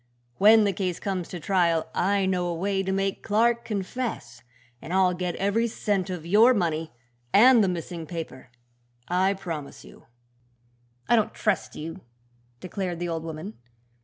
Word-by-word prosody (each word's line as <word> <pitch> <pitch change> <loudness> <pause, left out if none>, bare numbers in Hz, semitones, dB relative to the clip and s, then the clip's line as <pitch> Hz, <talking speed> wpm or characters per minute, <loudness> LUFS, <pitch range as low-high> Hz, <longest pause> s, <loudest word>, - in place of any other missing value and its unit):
When 215 +2 +7
the 200 -1 +1
case 180 -2 -2
comes 185 -4 -3
to 180 - -7
trial 170 -2 +1
I 195 +1 +1
know 180 -2 0
a 170 - -2
way 195 +3 -1
to 190 0 -2
make 195 0 -1
Clark 235 +2 +2
confess, 200 - -4 0.4
and - - -8
I'll 185 -1 +3
get 180 -1 -3
every 205 +4 +1
cent 205 -4 -1
of 180 -3 -5
your 220 +8 +5
money 160 -4 -1 0.4
and 235 - +7
the - - +2
missing 170 -2 -5
paper, 160 -6 -7 0.6
I 190 +3 +2
promise 165 -7 -7
you." - - -16 1.0
"I 240 - +4
don't 220 -3 0
trust - - -1
you," 165 +4 -7 0.6
declared 185 -1 -4
the 175 0 -3
old 165 -1 -3
woman. 165 +6 -7
185 Hz, 160 wpm, -26 LUFS, 170-205 Hz, 1.0 s, When